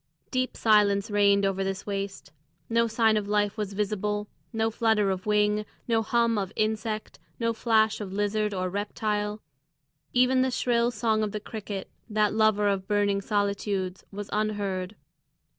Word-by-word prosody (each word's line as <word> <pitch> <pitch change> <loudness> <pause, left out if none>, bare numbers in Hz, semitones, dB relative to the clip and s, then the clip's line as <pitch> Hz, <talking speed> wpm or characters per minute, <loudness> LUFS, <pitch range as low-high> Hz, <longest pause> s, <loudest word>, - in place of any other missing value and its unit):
Deep 255 -1 -1
silence 205 -2 +3
reigned 200 -1 +4
over 195 0 0
this 195 0 -3
waste; 195 -6 -4 0.4
no 230 0 +3
sign 225 -1 +3
of 205 -1 -2
life 205 -1 +1
was 210 -3 -3
visible; 210 0 -1 0.2
no 225 -1 0
flutter 220 -3 +2
of 185 +1 -4
wing, 210 0 +2 0.2
no 225 -2 +2
hum 230 -1 +2
of 195 -1 -3
insect, 215 0 -2 0.2
no 230 -1 +1
flash 220 -1 +2
of 195 -2 -5
lizard 205 +1 0
or 185 -2 -1
reptile; 210 +2 -2 0.7
even 255 +1 +4
the 260 - +2
shrill 240 -1 +1
song 220 -1 0
of 210 -2 -2
the 210 - -2
cricket, 205 -2 -6 0.2
that 210 -1 +2
lover 215 -1 +3
of 195 -1 0
burning 205 -1 +1
solitudes, 200 -2 -1
was 205 0 -6
unheard. 205 -2 -1
210 Hz, 155 wpm, -27 LUFS, 200-220 Hz, 0.7 s, reigned